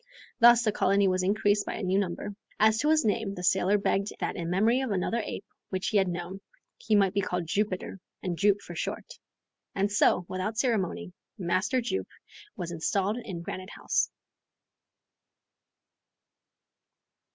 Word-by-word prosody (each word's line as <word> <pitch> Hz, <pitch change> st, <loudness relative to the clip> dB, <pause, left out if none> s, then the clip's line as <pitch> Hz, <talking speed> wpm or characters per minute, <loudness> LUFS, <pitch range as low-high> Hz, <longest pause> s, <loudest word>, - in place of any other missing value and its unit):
Thus 240 Hz, 0 st, +7 dB
the 215 Hz, -, +2 dB
colony 200 Hz, 0 st, +2 dB
was 185 Hz, 0 st, +1 dB
increased 205 Hz, +1 st, +1 dB
by -, -, -3 dB
a -, -, -5 dB
new 190 Hz, +1 st, +2 dB
member. 195 Hz, +1 st, -3 dB, 0.3 s
As 220 Hz, +1 st, +4 dB
to 300 Hz, -, +2 dB
his 315 Hz, -5 st, +3 dB
name 205 Hz, -1 st, 0 dB
the 180 Hz, -, -7 dB
sailor 190 Hz, +2 st, +3 dB
begged 200 Hz, 0 st, 0 dB
that -, -, -2 dB
in 170 Hz, -1 st, -4 dB
memory 220 Hz, +8 st, +3 dB
of 265 Hz, -, -2 dB
another 210 Hz, +4 st, 0 dB
ape 200 Hz, -, -6 dB, 0.2 s
which 185 Hz, -1 st, -2 dB
he 215 Hz, -, +2 dB
had 190 Hz, -1 st, +3 dB
known, 175 Hz, +2 st, -5 dB, 0.4 s
he 220 Hz, -, +1 dB
might 195 Hz, -2 st, +3 dB
be 200 Hz, -, +1 dB
called 180 Hz, -2 st, -2 dB
Jupiter, 195 Hz, +2 st, -2 dB, 0.2 s
and 180 Hz, -2 st, -2 dB
Jup 200 Hz, +2 st, +2 dB
for -, -, -9 dB
short. -, -, -5 dB, 0.6 s
And 200 Hz, +1 st, +1 dB
so, 190 Hz, -3 st, +3 dB
without 185 Hz, +4 st, -3 dB
more -, -, -27 dB
ceremony, 215 Hz, -7 st, -1 dB, 0.2 s
Master 190 Hz, +7 st, 0 dB
Jup 310 Hz, +12 st, -2 dB, 0.5 s
was 175 Hz, -4 st, -5 dB
installed 195 Hz, +5 st, 0 dB
in 180 Hz, -7 st, -6 dB
Granite 185 Hz, +2 st, -6 dB
House. -, -, 0 dB
200 Hz, 165 wpm, -28 LUFS, 185-215 Hz, 0.6 s, Thus